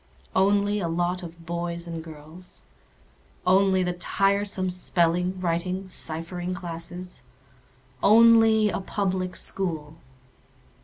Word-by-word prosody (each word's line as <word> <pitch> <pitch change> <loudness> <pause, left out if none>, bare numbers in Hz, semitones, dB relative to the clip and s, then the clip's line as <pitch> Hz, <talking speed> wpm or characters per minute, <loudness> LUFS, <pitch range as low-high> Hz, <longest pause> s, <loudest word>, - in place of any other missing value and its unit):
Only 205 +2 +2
a 175 - -2
lot 175 +2 -1
of 170 -1 -11
boys 170 0 -3
and 165 -1 -6
girls? 160 +3 -13 0.8
Only 190 0 +4
the 180 0 -1
tiresome 195 +1 0
spelling, 180 +1 0
writing, 180 +2 -2
ciphering 175 +1 -3
classes? 175 -2 -7 0.8
Only 225 -1 +6
a - - -2
Public 185 -2 -2
School? 160 -5 -2
180 Hz, 100 wpm, -25 LUFS, 170-195 Hz, 0.8 s, Only